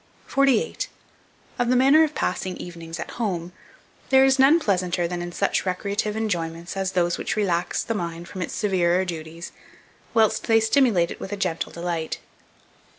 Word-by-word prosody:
48. 275 - +1 0.7
OF 245 -1 +1
THE 255 - +4
MANNER 275 +5 +6
OF 310 -1 -1
PASSING 185 0 -2
EVENINGS 165 -1 -8
AT - - -5
HOME, 180 -5 -2 0.6
there 265 0 +6
is 270 0 +3
none 285 +5 +6
pleasanter 180 - 0
than 175 0 -4
in 175 0 -5
such 195 +3 0
recreative 200 +3 -2
enjoyments 170 -5 -3
as 190 -1 -2
those 175 -1 +1
which - - -2
relax 180 -5 0
the 230 - -2
mind 170 -3 -4
from 185 - -7
its - - -4
severer 185 -3 +2
duties, 165 -1 -7 0.6
whilst 220 -2 +3
they 225 -1 +5
stimulate 220 -7 +3
it - - -7
with 195 - -7
a 205 - -3
gentle 180 -4 -2
delight. 170 -2 -3
185 Hz, 165 wpm, -24 LUFS, 170-225 Hz, 0.7 s, MANNER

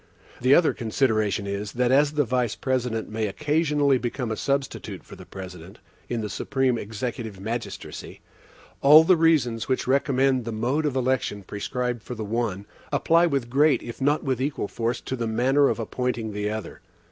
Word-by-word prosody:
The 130 +3 +6
other 170 - +4
consideration 110 -4 0
is, 100 0 -4
that 125 0 +1
as 145 +2 +4
the 150 -1 +2
Vice 125 -2 0
President 125 -4 -1
may 110 0 -2
occasionally 150 +2 +1
become 120 0 -3
a - - -1
substitute 140 +3 -3
for - - -12
the - - -13
President, 95 +1 -9 0.3
in 120 -2 -2
the 105 - -3
supreme 130 +3 0
executive 110 -1 -5
magistracy, 115 +4 -6 0.6
all 150 +3 +9
the 185 +3 +5
reasons 150 -9 +2
which 130 -1 0
recommend 135 -1 +2
the 115 - -4
mode 125 +8 0
of 140 - -2
election 130 -5 -1
prescribed 120 +4 -3
for 125 - -7
the 110 -1 -5
one, 105 -3 -2 0.3
apply 170 +1 +3
with 140 -6 -1
great 145 +5 +3
if 120 +3 -8
not 145 +3 +2
with 130 -2 -1
equal 135 -6 -2
force 115 +2 -2
to 130 - -4
the 120 -2 -3
manner 130 +5 +3
of - - -1
appointing 115 -1 -3
the 105 0 -2
other. 110 0 -6
125 Hz, 175 wpm, -25 LUFS, 110-140 Hz, 0.6 s, all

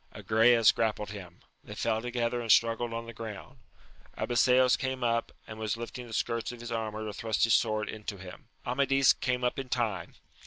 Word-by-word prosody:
Agrayes 115 +1 +4
grappled 105 -2 -1
him; 90 -4 -10 0.2
they - - -9
fell 110 -1 0
together 120 0 -1
and 115 -2 0
struggled 115 +1 +3
on 115 0 -4
the 115 - -9
ground. 115 +3 -9 0.6
Abiseos 125 +1 +4
came 130 -1 -3
up, 115 -1 0
and 110 0 -9
was 110 0 -2
lifting 120 +1 -7
the 115 - -10
skirts 115 +2 -1
of 125 - -10
his 120 0 -7
armour 110 -1 -3
to 105 - -5
thrust 110 -1 -1
his 115 - +4
sword 110 -3 +2
into 105 -1 -6
him. 90 -1 -11 0.2
Amadis 135 -1 +3
came 125 -1 -2
up 125 +2 0
in 135 -1 -6
time. 120 -5 -2
115 Hz, 190 wpm, -29 LUFS, 110-125 Hz, 0.6 s, Agrayes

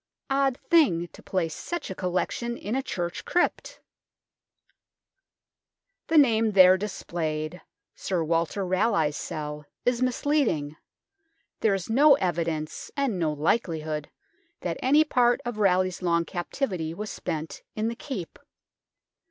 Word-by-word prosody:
Odd 270 -1 +2
thing 250 - +3
to - - -15
place 170 -4 -2
such 345 - -5
a - - -2
collection 185 +6 -2
hi - - -7
a 260 +5 +1
church 175 -9 -4
crypt! 355 - 0 2.3
The 325 - +3
name 225 -6 +4
there 185 -1 +8
displayed, 170 -4 -4 0.2
" - - -60
Sir 180 -4 -1
Walter 165 +4 0
Raleigh's 185 -5 +1
Cell," 150 -1 -5 0.2
is 245 0 +1
misleading; 250 - +1 0.8
there 205 -3 +3
is 190 -3 -4
no 280 +5 +6
evidence, 165 - -2
and 265 -9 0
no 160 -3 +1
likelihood, 155 -2 -1 0.5
that - - -2
any 290 +4 +5
part 245 -5 +3
of 240 -3 -4
Raleigh's 185 -2 +2
long 170 -1 +1
captivity 175 - -3
was 210 +2 -5
spent 160 -2 -5
in 215 +1 -1
the 230 - -2
Keep. 235 - -6
185 Hz, 125 wpm, -26 LUFS, 165-240 Hz, 2.3 s, there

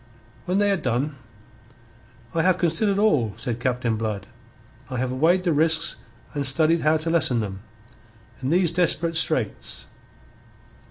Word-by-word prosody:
When 180 +2 0
they 205 0 +3
had 195 -3 0
done, 130 +4 -1 1.2
"I 165 - +1
have 180 +1 +3
considered 190 +4 0
all," 145 - +2
said 120 -3 -4
Captain 125 -3 -1
Blood. 105 -3 -3 0.6
"I 130 - -4
have 125 +1 -1
weighed 165 +8 +2
the 175 -3 +1
risks 160 +2 +2 0.4
and 145 - -2
studied 155 +5 +3
how 155 +1 +3
to 160 +1 -2
lessen 155 -8 +3
them. 95 -3 -4 0.8
In 130 - -2
these 175 +1 +3
desperate 170 -1 +1
straits...." 155 -8 0
155 Hz, 145 wpm, -23 LUFS, 125-170 Hz, 1.2 s, they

